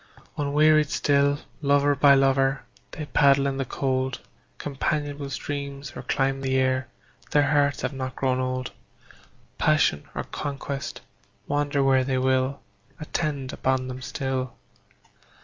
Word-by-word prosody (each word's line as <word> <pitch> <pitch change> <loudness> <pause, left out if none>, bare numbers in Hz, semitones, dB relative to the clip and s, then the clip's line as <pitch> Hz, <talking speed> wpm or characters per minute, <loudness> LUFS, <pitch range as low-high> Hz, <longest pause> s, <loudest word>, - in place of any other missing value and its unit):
Unwearied 150 0 +3
still, 140 -1 +2 0.2
lover 145 0 +3
by 140 0 +6
lover, 135 0 +2 0.3
They 155 - -6
paddle 140 -1 +4
in 135 -1 -1
the 135 - -1
cold 130 0 -1 0.4
Companionable 145 0 -2
streams 140 +1 -5
or - - -6
climb 135 +1 0
the 130 -1 0
air; 130 -1 +1 0.4
Their 145 -1 +3
hearts 145 -1 +2
have - - -1
not 130 -1 -5
grown 130 -1 0
old; 130 0 -2 0.9
Passion 155 - +2
or - - -2
conquest, 140 -1 -5 0.4
wander 145 -1 0
where 135 -1 +4
they 130 0 0
will, 130 +1 +1 0.4
Attend 150 -4 -3
upon 130 -1 0
them 130 0 -6
still. 130 -1 -3
135 Hz, 130 wpm, -25 LUFS, 130-145 Hz, 0.9 s, by